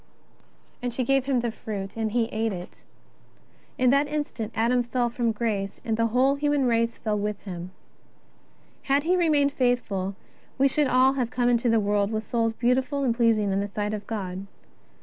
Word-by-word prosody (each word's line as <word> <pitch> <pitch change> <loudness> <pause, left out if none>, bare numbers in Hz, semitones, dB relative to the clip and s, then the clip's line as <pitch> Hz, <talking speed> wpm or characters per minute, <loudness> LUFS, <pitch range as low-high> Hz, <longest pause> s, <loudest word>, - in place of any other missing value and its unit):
And 245 0 -2
she 255 +2 -1
gave 270 +1 +2
him 265 -3 +1
the 235 -1 -1
fruit, 200 -3 -6
and 220 -1 -2
he 235 0 +2
ate 225 0 -1
it. 180 -2 -8 1.0
In 255 -1 +4
tha'j 280 +2 +3
instant 290 -7 -3
Adam 240 +2 +2
fell 240 0 -1
from 235 -1 0
grace 210 -3 -2
and 225 -2 0
the 230 +1 +2
whole 255 +4 +3
human 290 -1 +1
race 230 -1 +1
fell 210 -2 -1
with 210 0 -2
him. 180 -3 -7 1.2
Had 280 +1 +2
he 355 +3 +2
remained 300 -5 +2
faithful, 215 -7 0 0.4
we 275 +1 +4
should 290 +1 +1
all 260 +1 +4
have 255 -4 -1
come 245 0 +1
into 240 0 +2
the 225 0 +4
world 205 -1 +1
with 220 0 -2
souls 225 0 0
beautiful 260 +4 0
and 245 -3 +2
pleasing 225 -4 +2
in 195 - +1
the 200 - -1
sight 210 +1 -3
of 210 -1 -5
God. 195 -3 -4
235 Hz, 190 wpm, -26 LUFS, 210-260 Hz, 1.2 s, In